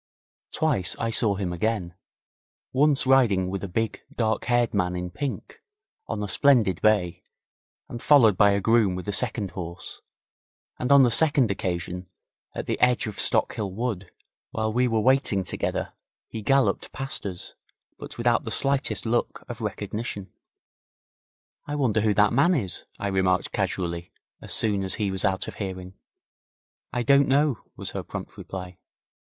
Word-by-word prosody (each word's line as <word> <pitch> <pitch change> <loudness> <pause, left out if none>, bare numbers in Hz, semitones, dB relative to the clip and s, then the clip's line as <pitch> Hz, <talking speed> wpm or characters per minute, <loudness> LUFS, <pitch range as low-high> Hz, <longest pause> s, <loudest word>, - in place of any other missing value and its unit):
Twice 140 - +1
I 115 0 -2
saw 110 -3 +2
him 95 -3 -3
again, 90 -1 -2 0.8
once 145 +1 +3
riding 110 -9 +3
with 100 0 -4
a - - -3
big, 110 +5 -2
dark 110 -2 -1
haired 120 -1 +1
man 90 -3 0
in 90 0 -4
pink, 140 +8 -6 0.5
on 105 - -3
a - - -3
splendid 110 - +3
bay 100 -6 +1 0.6
and 120 - -7
followed 120 -9 +5
by 100 +2 +5
a 100 - 0
groom 110 -4 +3
with 90 +2 -7
a 105 - -1
second 110 -4 -2
horse, 85 -2 -8 0.8
and 125 - -1
on 140 -1 +8
the 120 - +3
second 135 -3 +3
occasion, 90 -1 -4 0.5
at - - -4
the - - -2
edge 125 -1 +3
of 105 -2 -6
Stockhill 100 -4 +1
Wood 110 -5 -3 0.4
while 110 0 -2
we 125 +2 +2
were 115 -2 +1
waiting 125 -5 +2
together - - -3 0.3
he 110 - -7
galloped 135 +4 +1
past 135 +1 -5
us, 90 -3 -7 0.5
but - - -9
without 120 -1 +2
the - - -5
slightest 135 +3 +1
look 120 +1 -1
of 120 -1 -7
recognition. 105 -1 -5 1.3
'I 145 - -3
wonder 115 -7 +1
who 105 -1 +1
that 105 +1 +4
man 150 +8 +4
is?' 100 - -1
I - - -5
remarked 95 -2 +1
casually, 85 -1 -3 0.3
as - - -8
soon 100 -3 +1
as 95 - 0
he 105 -3 -1
was 95 -1 -2
out 95 -1 0
of - - -8
hearing. 95 -1 -5 1.0
'I 125 - -1
don't 140 +3 +4
know,' 140 -1 +2 0.2
was - - -5
her - - -4
prompt - - -8
reply. 90 -1 -8
110 Hz, 160 wpm, -25 LUFS, 95-125 Hz, 1.3 s, on